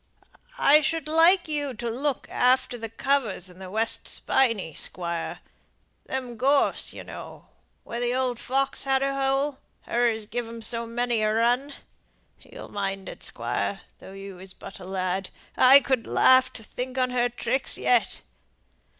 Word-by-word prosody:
I 300 -7 +6
should 325 -1 -1
like 330 +4 +5
you 290 -4 -2
to 235 +2 -5
look 260 +4 -2
after 250 -1 +2
th' 225 0 -8
covers 230 -10 0
in 180 - -17
th' 190 -1 -8
West 220 +4 +2
Spinney, 230 - +1
Squire; 170 0 -3 0.7
them 255 -3 -4
gorse, 275 +4 +2
you - - -9
know, - - -10 0.3
where 235 - -5
th' 240 0 0
old 255 -2 -1
fox 270 +1 0
had 270 0 +2
her 275 0 0
hole 270 +1 0 0.2
her 240 0 +1
as 220 -1 -2
give 240 +2 -4
'em 230 0 -9
so 230 +1 0
many 240 -1 -1
a 215 0 +2
run. 245 +6 +1 0.7
You'll - - -12
mind 195 -1 -3
it, - - -10
Squire, - - -3 0.2
though 190 - -12
you 195 -1 -9
was 185 0 -12
but - - -10
a - - -10
lad. 185 0 -2 0.3
I 265 +2 +8
could 260 -4 -1
laugh 260 0 +5
to 225 - -9
think 255 +4 -6
on 255 -1 +1
her 245 -1 +1
tricks 260 +2 -2
yet." 245 -2 +1
245 Hz, 165 wpm, -26 LUFS, 215-270 Hz, 0.7 s, I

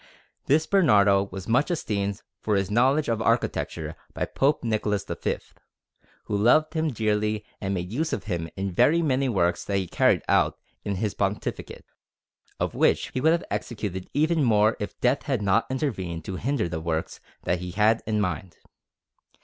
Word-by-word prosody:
This 155 +3 +3
Bernardo 105 - +4
was 95 0 -7
much 125 +8 +2
esteemed 100 - -2 0.2
for 105 - 0
his 100 0 0
knowledge 135 +7 +3
of 115 -1 0
architecture 110 -9 -1 0.2
by - - -1
Pope 140 +1 +1
Nicholas 105 -3 0
V, - - -2 0.9
who 105 - -3
loved 155 +10 +4
him 160 -1 0
dearly 105 -2 0 0.2
and 100 -1 -1
made 90 +1 -4
use 155 +5 -1
of - - -2
him 85 -5 -3
in 95 0 -3
very 165 - +3
many 135 -3 +1
works 90 -6 +1
that 100 - 0
he 95 - -1
carried - - +2
out - - +2 0.3
in 100 - -2
his 105 +2 -1
pontificate, 100 +1 -3 0.7
of - - -1
which - - +2
he 130 - -1
would 160 +3 +5
have 170 +1 +1
executed 100 -5 -4
even 155 +1 +2
more 110 -2 +4
if 105 - -6
death 125 +3 +2
had 130 -7 -2
not 100 +3 +2
intervened 95 - -3
to 95 - -4
hinder 135 -4 -1
the 80 -1 -4
works 80 -1 -3 0.2
that 90 - 0
he 90 0 -5
had 110 +4 +2
in 110 -1 +1
mind. 90 -3 -3
105 Hz, 175 wpm, -25 LUFS, 95-130 Hz, 0.9 s, would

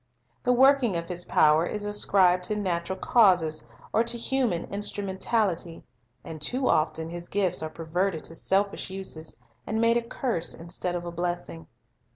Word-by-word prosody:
The 250 - +1
working 255 -5 +4
of 170 0 -4
His 175 0 -3
power 155 +1 +4
is 205 +4 -3
ascribed 185 -3 +3
to 210 - -1
natural 185 -2 -2
causes 175 - +3 0.3
or 225 - +4
to 235 +1 -1
human 235 -7 0
instrumentality, 200 -3 -2 0.4
and 155 -2 -8
too 255 - 0
often 160 +1 +1
His 170 +1 -7
gifts 190 -4 0
are 155 - -3
perverted 165 +2 -2
to - - -7
selfish 195 +4 0
uses, 185 -4 -6 0.3
and 220 - -1
made 230 +1 +4
a - - +1
curse 230 -6 -3
instead 175 +1 -3
of 175 0 -4
a 175 - -5
blessing. 175 -1 -4
185 Hz, 160 wpm, -27 LUFS, 170-210 Hz, 0.4 s, working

